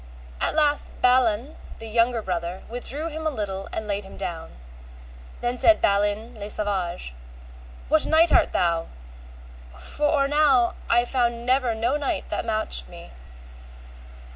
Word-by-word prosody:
At - - -1
last 295 -2 +3
Balan 250 +1 +2 0.2
the 225 - -9
younger 230 +1 +1
brother 175 0 -4
withdrew 270 +7 -4
him 315 0 -4
a - - +3
little 195 -7 -5
and 220 - -5
laid 205 0 -2
him 195 - -12
down. 170 -4 -6 0.9
Then 245 +1 -2
said 330 - +5
Balin 205 +3 0
le 205 0 -6
Savage, 185 - -2 0.7
What 310 +1 +3
knight 320 +1 +5
art - - +4
thou? 170 -2 0 0.9
for 295 - -1
or 280 -2 +2
now 280 -5 +3 0.2
I 240 +1 +4
found 240 -2 -1
never 255 -2 +2
no 235 +6 0
knight 290 -2 -3
that - - -3
matched 215 - 0
me. - - -12
235 Hz, 140 wpm, -24 LUFS, 200-275 Hz, 0.9 s, said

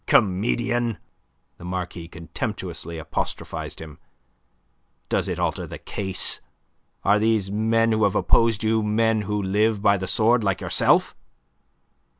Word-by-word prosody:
"Comedian!" 115 +3 +2 0.6
the - - -11
Marquis 90 -2 -5
contemptuously 85 0 -5
apostrophized 80 - -4
him. 80 -1 -10 1.1
"Does - - 0
it - - -2
alter - - -1
the - - -7
case? 95 -2 -1 0.6
Are 100 +1 +4
these 110 -3 +1
men 115 +2 +2
who 110 0 +2
have 100 - +1
opposed 115 -2 +3
you 110 0 +2
men 110 +1 +2
who 105 0 -2
live 105 +2 +1
by 100 -1 +5
the 95 0 -4
sword 115 +4 +3
like 95 -3 0
yourself?" - - +2
105 Hz, 130 wpm, -24 LUFS, 95-110 Hz, 1.1 s, by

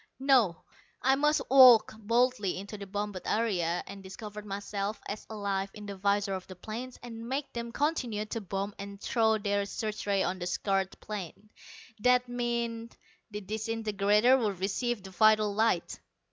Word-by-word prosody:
No, 255 -10 +3 0.4
I 265 - +5
must 300 +2 +2
walk 255 -4 +8
boldly 230 -2 +1
into 200 +3 -7
the 200 -1 -8
bombed 205 -1 -4
area 180 -7 0
and 195 0 -9
discover 210 +2 -8
myself 200 0 -4
as 210 - -6
alive 200 -2 -2
in 210 -1 -9
the 200 -1 -6
visors 200 0 +1
of 185 - -12
the 185 - -9
planes 230 +7 -7
and 230 -1 -8
make 275 +2 -3
them 235 0 -4
continue 245 -7 -1
to 225 +1 -4
bomb 195 +1 -3
and 200 0 -7
throw 220 -1 +2
their 205 -1 0
search 215 0 -4
rays 200 -1 +2
on 185 - -2
the 175 - -3
scarred 195 +1 -1
plain. 210 0 -7 0.5
That 250 +2 +3
meant 235 -1 -3 0.3
the 210 -1 -6
disintegrator 215 +3 +2
would 205 -6 -1
receive 210 +3 -1
the 190 - -10
vital 215 +1 +4
light. 220 -4 +1
210 Hz, 160 wpm, -30 LUFS, 200-235 Hz, 0.5 s, walk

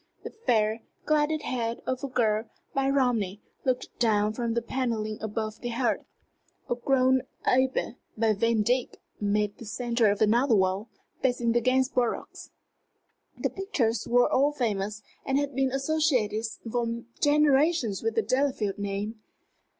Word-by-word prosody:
The - - -6 0.2
fair, 220 -1 +2 0.2
clouded 305 0 +1
head 235 -2 -2
of 255 +1 -2
a - - -1
girl, 225 -4 +1 0.3
by 270 0 +1
Romney, 235 -8 +1 0.3
looked 255 -1 -2
down 215 -2 +2
from 230 0 -2
the 235 - +1
panelling 230 -4 -2
above 220 0 -3
the 240 - -3
hearth. 240 +1 -1 0.6
A - - +1
gowned 260 +1 +2 0.2
abbé, 260 -2 +1 0.2
by 220 0 +3
Vandyck, 230 +3 +1 0.2
made 205 0 0
the 230 - -9
centre 235 0 +1
of 205 - 0
another 235 +3 +4
wall, 190 +3 +1 0.3
facing 245 -2 +1
the 240 +1 +2
Gainsboroughs. 255 -1 0 0.9
The - - -1
pictures 265 - -1
were 245 +1 +5
all 280 +3 +3
famous, 210 -5 -2 0.2
and 270 0 0
had 285 0 -1
been 265 0 +1
associated 270 -6 +1 0.3
for 235 -1 -1 0.2
generations 290 - +3
with 225 0 -1
the 225 - +2
Delafield 255 -4 0
name. 205 +2 -3
235 Hz, 140 wpm, -27 LUFS, 215-260 Hz, 0.9 s, were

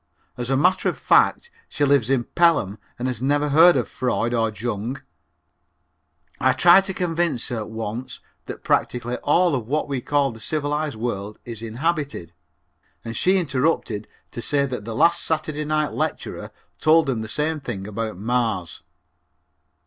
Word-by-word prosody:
As 125 0 -5
a 135 - +2
matter 180 +6 +2
of - - -5
fact, 475 - +3 0.2
she 145 - 0
lives 140 -4 +3
in 135 -3 +2
Pelham 120 - +2 0.2
and 125 - -2
has 125 -3 -3
never 145 +2 +1
heard 165 +4 +7
of 125 - -1
Freud 120 -2 -1
or 115 -2 +1
Jung. 115 +4 -4 1.4
I 130 0 +3
tried 175 +8 +6
to 190 - -3
convince 170 -8 -1
her 110 -3 -4
once 110 +2 -6 0.3
that - - -8
practically 125 0 0
all 170 +3 +2
of 120 -5 -2
what 150 +4 -1
we 135 -3 -3
call 140 0 +1
the 115 - -12
civilized 150 +1 -2
world 105 -2 -4
is 115 -2 -6
inhibited, 130 - -3 0.7
and 115 0 -5
she 185 - +3
interrupted 135 - -1 0.2
to 120 - -6
say 140 +2 +1
that 125 -6 -5
the 115 -1 -5
last 170 +7 +3
Saturday 155 -1 -2
night 155 0 0
lecturer - - -3 0.3
told 160 +1 +5
them 130 -5 -1
the 110 - -5
same 150 +7 -1
thing 120 -8 -6
about 110 0 -4
Mars. 110 -5 -1
130 Hz, 160 wpm, -23 LUFS, 115-155 Hz, 1.4 s, heard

